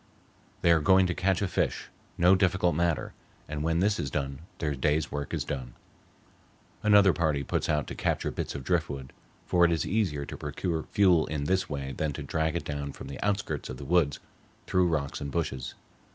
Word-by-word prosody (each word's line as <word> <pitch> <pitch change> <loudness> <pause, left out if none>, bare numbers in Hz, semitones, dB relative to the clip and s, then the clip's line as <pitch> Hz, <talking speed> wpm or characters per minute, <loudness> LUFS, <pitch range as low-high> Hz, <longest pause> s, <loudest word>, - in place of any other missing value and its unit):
They 85 - +5
are 85 - +5
going 95 +5 +5
to 90 - 0
catch 95 +2 +1
a - - +1
fish, - - -1 0.3
no 90 +2 +6
difficult 90 -2 +3
matter, 85 0 0 0.3
and 75 0 -4
when 80 +2 +1
this 105 +1 +2
is 70 - -2
done 70 0 -3 0.2
their 75 -3 -1
day's 75 +3 0
work 70 -1 -4
is - - -1
done. 60 -2 -5 1.1
Another 105 -3 +6
party 75 -5 0
puts - - -1
out 75 -1 +1
to - - -6
capture - - -1
bits - - -4
of 70 - -5
driftwood, 70 -4 -2 0.3
for 90 -1 +3
it 85 - +5
is 80 - 0
easier 90 -9 0
to - - -7
procure 80 +2 -3
fuel 90 -5 +4
in 75 -2 -2
this 95 +6 0
way 70 -2 -4
than 75 -2 -1
to 75 - -6
drag 80 +3 -1
it 85 - -2
down 70 -1 -4
from - - -9
the 70 - -7
outskirts 100 -7 -1
of 65 - -6
the 70 - -8
woods 80 -3 +2 0.5
through 90 -1 +2
rocks 75 -5 -2
and 70 - -3
bushes. 65 -6 -3
80 Hz, 200 wpm, -28 LUFS, 70-90 Hz, 1.1 s, no